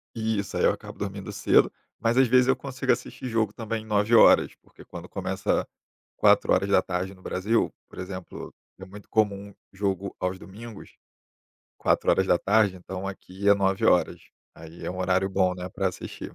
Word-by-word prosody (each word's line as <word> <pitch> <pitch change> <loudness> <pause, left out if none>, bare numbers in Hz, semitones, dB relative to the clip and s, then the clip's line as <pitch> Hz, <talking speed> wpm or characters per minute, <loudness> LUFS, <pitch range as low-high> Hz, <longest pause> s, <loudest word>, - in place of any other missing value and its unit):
Isso, 110 -3 -2
aí - - 0
eu - - +5
acabo - - -9
dormindo - - -5
cedo, - - +3 0.3
mas 115 +2 +1
às 130 - +5
vezes 125 +1 +4
eu 135 - +4
consigo 135 -1 -2
assistir 125 +1 -3
jogo 110 -3 0
também 110 -1 -5
21:00, 105 +2 +5
porque - - -18
quando - - -10
começa - - -2 0.5
4:00 95 -1 +2
no 95 - -19
Brasil, 105 +6 0 0.2
por - - -12
exemplo, 90 -1 -8 0.3
é 95 - -9
muito 100 +2 -13
comum 100 -2 0 0.2
jogo 100 -1 -2
aos 90 0 -2
domingos 110 +3 -11 0.8
4:00, 105 -4 +2
então 95 +1 -7
aqui 95 +1 -4
é 100 - +8
21:00. 95 -1 +2 0.3
Aí 80 +1 -12
é - - -3
um 90 - -7
horário 95 +1 +1
bom, 95 -1 +1
né, 90 0 -6
pra 95 +1 -1
assistir. 90 - -8
100 Hz, 155 wpm, -26 LUFS, 95-110 Hz, 0.8 s, é